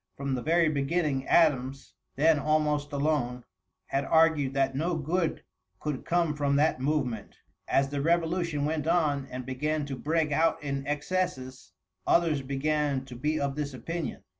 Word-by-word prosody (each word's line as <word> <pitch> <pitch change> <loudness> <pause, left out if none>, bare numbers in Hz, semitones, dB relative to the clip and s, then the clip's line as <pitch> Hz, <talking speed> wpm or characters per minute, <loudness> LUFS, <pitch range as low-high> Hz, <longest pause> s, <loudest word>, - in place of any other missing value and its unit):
From 140 -1 -2
the 125 - -1
very 165 +3 +3
beginning 145 -2 0
Adams, 135 -5 +2 0.2
then 155 +1 +4
almost 150 0 +1
alone, 140 -4 -1 0.4
had 135 +1 -1
argued 160 -4 +3
that 135 -1 +2
no 165 +6 -1
good 160 +2 -1 0.4
could 150 -3 -4
come 170 -3 +1
from 140 -1 +1
that 150 -1 +2
movement, 130 -7 -2 0.3
as 135 0 +2
the 140 0 -2
revolution 165 -1 +1
went 155 0 -2
on 150 -5 +1
and 125 0 -6
began 150 +4 -2
to 140 -2 -5
break 155 +3 0
out 160 +1 +2
in 140 -1 -3
excesses, 150 -3 -3 0.3
others 165 -4 +3
began 140 0 -1
to 125 - -10
be 150 +5 -1
of 140 -1 -1
this 145 -3 -3
opinion. 160 +3 -5
145 Hz, 155 wpm, -28 LUFS, 135-160 Hz, 0.4 s, then